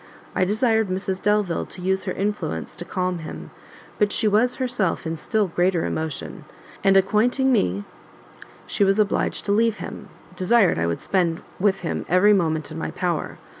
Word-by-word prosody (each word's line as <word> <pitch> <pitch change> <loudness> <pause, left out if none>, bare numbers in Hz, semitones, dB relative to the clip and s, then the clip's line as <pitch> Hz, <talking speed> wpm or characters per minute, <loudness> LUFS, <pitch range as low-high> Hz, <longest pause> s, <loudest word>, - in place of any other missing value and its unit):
I 185 - +2
desired 220 +2 +2
Mrs 190 0 -3
Delvile 210 -4 +1
to - - -7
use 190 +1 0
her - - -2
influence 195 - -3
to 175 - -7
calm 180 -1 -2
him; 160 - -8 0.5
but 205 -1 +3
she 215 - +2
was 220 +4 +3
herself 245 -11 -1
in 160 0 -2
still 210 +6 0
greater 175 -1 +1
emotion, 160 -2 -4 0.4
and 195 0 +5
acquainting 240 +7 +2
me 100 - +1 0.8
she - - 0
was 195 +1 +3
obliged 210 -2 0
to 200 - 0
leave 225 +1 +3
him, - - -8 0.3
desired 190 - +3
I 85 - +1
would 85 - -2
spend 175 -4 0 0.2
with 195 0 +2
him 170 - -3
every 185 +4 +5
moment 160 -5 0
in 160 - -6
my - - -3
power. 175 -3 -2
190 Hz, 170 wpm, -23 LUFS, 170-210 Hz, 0.8 s, and